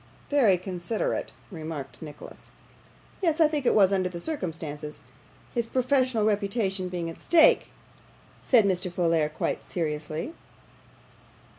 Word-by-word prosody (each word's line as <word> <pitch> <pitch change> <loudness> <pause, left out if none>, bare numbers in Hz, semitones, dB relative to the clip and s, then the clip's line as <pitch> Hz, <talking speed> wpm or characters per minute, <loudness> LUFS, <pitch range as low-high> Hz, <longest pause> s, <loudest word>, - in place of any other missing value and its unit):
'Very 235 -10 +5
considerate,' 180 +4 -3 0.2
remarked 155 -7 -7
Nicholas. 150 -2 -11 0.7
'Yes, 330 -3 +1
I 320 - +7
think 295 -4 -1
it - - +4
was 200 -2 +5
under 185 -1 +1
the 175 -1 -7
circumstances; 160 - -4 0.5
his 235 -2 -1
professional 255 -3 +2
reputation 200 -2 0
being 175 -2 -3
at 165 - -8
stake,' 330 -2 +5 0.7
said 235 -5 +4
Mr. 185 -1 0
Folair, 165 -3 +1
quite - - -2
seriously. 155 - -3
185 Hz, 120 wpm, -27 LUFS, 165-240 Hz, 0.7 s, I